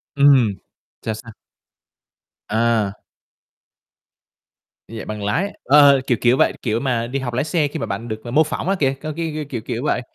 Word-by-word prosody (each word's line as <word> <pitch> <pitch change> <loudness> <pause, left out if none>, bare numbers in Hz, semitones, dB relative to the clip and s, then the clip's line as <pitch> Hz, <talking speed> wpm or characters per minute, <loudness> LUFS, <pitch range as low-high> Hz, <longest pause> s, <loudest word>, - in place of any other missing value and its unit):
Ừm. 140 -7 +5 0.5
Sao 110 - -2
sao? 110 +2 -10 1.2
À. 110 -2 0 1.9
Dạy 115 -1 -7
bằng 105 -1 -5
lái. 165 - -1
Ờ! 140 0 +6
Kiểu 120 - +2
kiểu 120 +1 +4
vậy, - - +3
kiểu 115 -2 0
mà, 120 -3 -1
đi 135 +3 -3
học 125 -2 -4
lái 125 - 0
xe 155 -1 0
khi 150 +3 -6
mà - - -2
bạn 115 - -5
được, 110 -1 -6
à, 120 - -7
mô 150 +5 +5
phỏng 160 +3 -4
á, 195 - +2
kìa 135 -2 +2
cái 155 0 -4
cái 155 -2 -3
kiểu 120 -5 -4
kiểu 115 +2 -4
vậy. 135 - 0
125 Hz, 185 wpm, -20 LUFS, 115-145 Hz, 1.9 s, Ờ